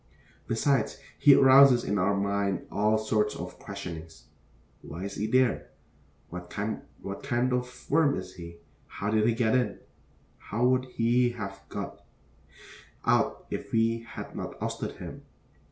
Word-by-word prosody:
Besides, 135 +4 +1 0.2
he 140 -2 +8
arouses 135 -2 +7
in 105 - 0
our 100 +2 +2
mind 100 -1 -1
all 105 +2 +2
sorts 110 -1 0
of - - -7
questionings. 85 -5 -8 0.5
Why 85 +3 -7
is 100 0 -4
he 105 +2 -2
there? 130 0 +2 0.6
What 90 0 -7
kind 105 +2 -3 0.7
of 125 0 -4
worm 150 -1 +4
is - - -7
he? 85 -1 -10 0.3
How 100 +3 -3
did 110 0 +3
he 115 - +2
get 115 -2 +2
in? 125 -5 +1 0.6
How 115 +4 -1
would 130 0 +3
he 120 0 +2
have 95 -2 -6
got - - -6 1.0
out - - +2
if - - -5
we 115 0 +2
had 115 0 -9
not - - -6
ousted - - -3
him? - - -9
110 Hz, 140 wpm, -28 LUFS, 100-125 Hz, 1.0 s, he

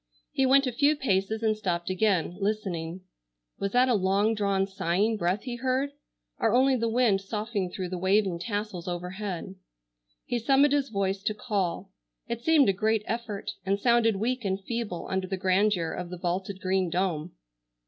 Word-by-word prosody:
He 265 - +2
went 275 +1 +5
a 255 - 0
few 285 +5 +3
paces 220 -4 0
and 215 -1 +2
stopped 180 -4 -2
again, 185 -3 +1
listening. 190 -4 -2 0.6
Was 200 0 -2
that 250 +1 +5
a 250 - +3
long 200 +2 +2
drawn 200 -2 +1
sighing 195 +3 0
breath 185 0 -1
he 245 -2 -5
heard, 260 +3 0 0.5
or 225 0 +2
only 265 +1 +4
the 230 -2 0
wind 225 -4 +3
soughing 210 -1 -3
through 180 0 -5
the 180 -1 -4
waving 190 -1 +2
tassels 205 -2 -4
overhead? 180 +1 -4 0.7
He 240 - -1
summoned 275 +4 +4
his 280 -1 +1
voice 195 -2 -1
to 210 +1 -1
call. 195 -4 -2 0.4
It 235 0 -4
seemed 310 +1 +5
a 195 - +4
great 215 +2 +1
effort, 230 -3 -4
and 195 +1 0
sounded 235 -2 +3
weak 240 +5 -1
and 190 -1 -1
feeble 225 -5 -4
under 190 0 -2
the 190 - -3
grandeur 185 -2 +2
of 180 -1 -5
the 180 - -6
vaulted 185 +2 -3
green 185 -1 +1
dome. 175 -2 -1
200 Hz, 175 wpm, -27 LUFS, 185-230 Hz, 0.7 s, went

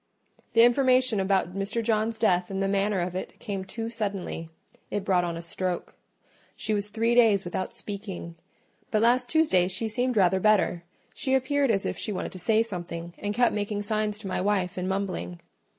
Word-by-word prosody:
The 230 0 +7
information 255 -2 +4
about 190 -2 +1
Mr. 200 +4 -1
John's 220 0 0
death 180 -5 +2
and 195 -1 -3
the 195 - +1
manner 200 -1 +1
of 175 0 -3
it 185 - -6
came 195 -2 -4
too 225 +4 -5
suddenly: 200 -7 -4 0.4
it 205 -1 -3
brought 185 -3 +3
on 170 -1 -3
a 170 - -6
stroke. 180 +1 -3 0.6
She 215 - -2
was 205 0 0
three 230 +2 +1
days 220 -6 +4
without 180 +1 -3
speaking; 195 -5 -6 0.6
but 215 0 +1
last 245 +1 +3
Tuesday 245 - +3
she 190 +5 -2
seemed 245 +2 -1
rather 190 -1 +4
better: 195 -4 +2 0.3
she 265 0 +1
appeared 275 +1 +1
as 195 -3 +1
if - - -3
she 215 - -2
wanted 190 - -4
to 185 - -8
say 220 +5 +3
something, 175 -5 -6
and 205 0 -3
kept 245 +1 +3
making 205 0 -2
signs 215 0 -1
to 210 -2 -8
my 185 - -1
wife 190 -2 0
and 185 0 -2
mumbling. 185 - -3
205 Hz, 190 wpm, -27 LUFS, 185-225 Hz, 0.6 s, The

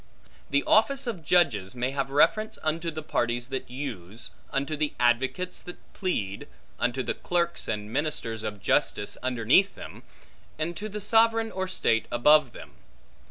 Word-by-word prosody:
The 140 0 +2
office 275 +5 +3
of 210 -9 -4
judges 135 - +2
may 125 +1 -1
have 135 -1 -2
reference 215 +10 +2
unto 160 +2 -1
the 155 -1 -6
parties 120 -3 -1
that 135 -3 -4
use, 120 -6 -6 0.2
unto 140 +3 -1
the 150 0 -1
advocates 130 +10 +1
that 180 - -9 0.2
plead, 105 - -3 0.3
unto 125 +1 0
the 120 - -1
clerks 170 -1 -2
and 105 0 -4
ministers 130 -6 -2
of 105 -3 -5
justice 105 - +1
underneath 130 - +3
them, - - -10 0.6
and 165 +3 -2
to 215 +4 -5
the 210 +1 -6
sovereign 225 +1 +3
or 190 0 -3
state 115 -11 +1
above 150 +2 +5
them. - - -11
145 Hz, 155 wpm, -27 LUFS, 120-180 Hz, 0.6 s, above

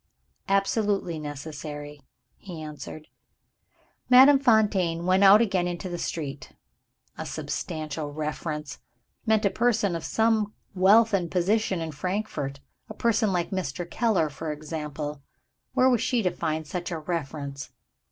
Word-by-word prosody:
"Absolutely 195 -3 +1
necessary," 145 0 -7 0.4
he 180 -5 -8
answered. 155 0 -8 1.0
Madame 265 +2 +8
Fontaine 205 -9 +2
went 185 +2 +4
out 200 +3 +8
again 190 -5 +1
into 175 +1 -4
the 175 -1 -4
street. 140 -6 -5 0.7
"A - - -4
substantial 155 -1 -4
reference" 150 0 -4 0.5
meant 220 -1 +3
a 200 - +3
person 220 -6 +1
of 165 - -4
some 220 -2 +1 0.2
wealth 205 +4 +5
and 180 -4 +1
position 190 +1 +1
in 160 -1 -4
Frankfort 150 -4 -3 0.3
a - - -8
person 225 -2 +2
like 175 -2 -1
Mr. 175 -3 -3
Keller, 190 -7 +1
for 155 +2 -5
example. 150 -1 -5 0.5
Where 255 -1 +5
was 245 -3 +3
she 240 -2 +1
to 180 - +2
find 160 -1 -2
such 175 +3 -4
a 170 - -3
reference? 145 -4 -4
175 Hz, 130 wpm, -26 LUFS, 150-205 Hz, 1.0 s, Madame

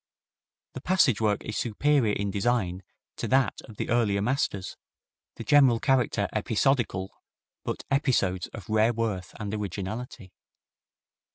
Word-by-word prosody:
The 130 - -7
passage 145 - +3
work 105 -2 +1
is 110 - -4
superior 120 0 +1
in 100 0 -2
design 100 -3 0 0.4
to - - -3
that 130 0 +2
of 110 - -13
the - - -3
earlier 110 -4 +2
masters, 105 -4 -1 0.6
the - - -7
general 135 -5 +5
character 130 -2 +1
episodical, 120 -8 0 0.4
but - - -4
episodes 105 -10 +1
of 100 -5 -10
rare 110 +2 +3
worth 105 -6 -3
and 105 -2 -4
originality. 105 +1 -5
110 Hz, 125 wpm, -27 LUFS, 100-125 Hz, 0.6 s, general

